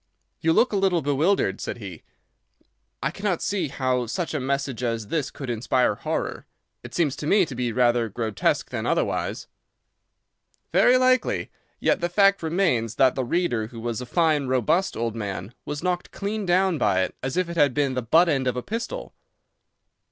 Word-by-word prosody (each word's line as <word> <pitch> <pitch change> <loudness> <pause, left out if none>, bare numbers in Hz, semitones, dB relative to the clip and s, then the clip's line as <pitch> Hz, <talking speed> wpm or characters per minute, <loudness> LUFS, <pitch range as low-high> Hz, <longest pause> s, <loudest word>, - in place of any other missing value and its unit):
"You 165 - +2
look 240 +7 +3
a - - +2
little 185 -4 +2
bewildered," 145 - +1
said - - -4
he. 95 -8 -9 1.0
"I 140 - 0
cannot 195 -1 -1
see 190 -5 -1
how 130 -3 -1
such 165 +9 -3
a 155 - -1
message 135 -1 -2
as 115 -3 -2
this 150 -5 -1
could 135 - -8
inspire 120 0 +1
horror. - - -4 0.3
It - - -10
seems 150 -6 +1
to 150 - -4
me 195 +2 +4
to 145 - -8
be 125 -1 -2
rather 120 -1 +2
grotesque 110 0 -1
than - - -3
otherwise." - - -1 1.3
"Very 220 +8 +6
likely. 255 0 +2 0.3
Yet - - +1
the 175 - 0
fact 195 +2 +4
remains 160 - 0
that 130 -2 +4
the 130 - -2
reader, 120 -6 0
who 115 0 -10
was 120 +1 -3
a 125 - -7
fine, 155 -4 +2
robust 130 - +1
old 115 -1 -2
man, 100 -1 -5
was 145 +2 -5
knocked 180 -1 -1
clean 205 0 -4
down 180 -2 +2
by 95 -3 +2
it - - -4
as 135 +5 -3
if 185 -1 +1
it 170 - -6
had 145 -6 +3
been 140 -2 +1
the 130 - -1
butt 160 +10 +4
end 135 -5 +1
of 125 0 0
a 125 - -3
pistol." 235 - -5
140 Hz, 185 wpm, -24 LUFS, 120-175 Hz, 1.3 s, Very